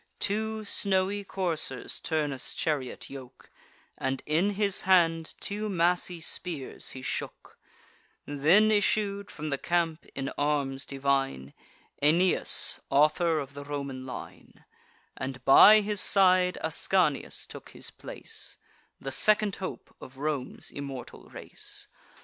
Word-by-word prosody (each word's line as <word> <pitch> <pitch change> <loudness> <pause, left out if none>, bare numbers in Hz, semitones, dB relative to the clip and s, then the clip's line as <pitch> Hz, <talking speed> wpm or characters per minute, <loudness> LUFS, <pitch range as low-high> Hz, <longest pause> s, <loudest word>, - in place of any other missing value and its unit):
Two 220 +1 -2
snowy 200 0 0
coursers 170 -9 -1
Turnus' 150 -5 -2
chariot 145 -5 -2
yoke, 130 -3 -12 0.5
And 130 0 -2
in 175 +7 +1
his 200 -1 +1
hand 165 -3 +3
two 210 +1 -3
massy 175 -1 +1
spears 160 -3 -1
he 130 - -8
shook: - - -6 0.7
Then 160 +10 +4
issued 205 -1 +1
from 155 0 -6
the 140 - -1
camp, 170 -2 -1
in 135 0 -3
arms 140 -2 -1
divine, 135 - -1 0.5
Aeneas, 170 +5 +3
author 155 +4 +3
of 140 -2 -5
the 145 0 -8
Roman 140 -2 -5
line; 130 - -10 0.5
And 130 -1 -6
by 210 +10 +9
his 205 -1 -1
side 185 -2 +4
Ascanius 160 -1 0
took - - -11
his - - -7
place, - - -6 0.4
The 135 - -5
second 210 +6 +3
hope 190 - -7
of 130 +1 -12
Rome's 145 -2 -3
immortal 135 -3 -8
race. - - -5
160 Hz, 120 wpm, -28 LUFS, 140-190 Hz, 0.7 s, by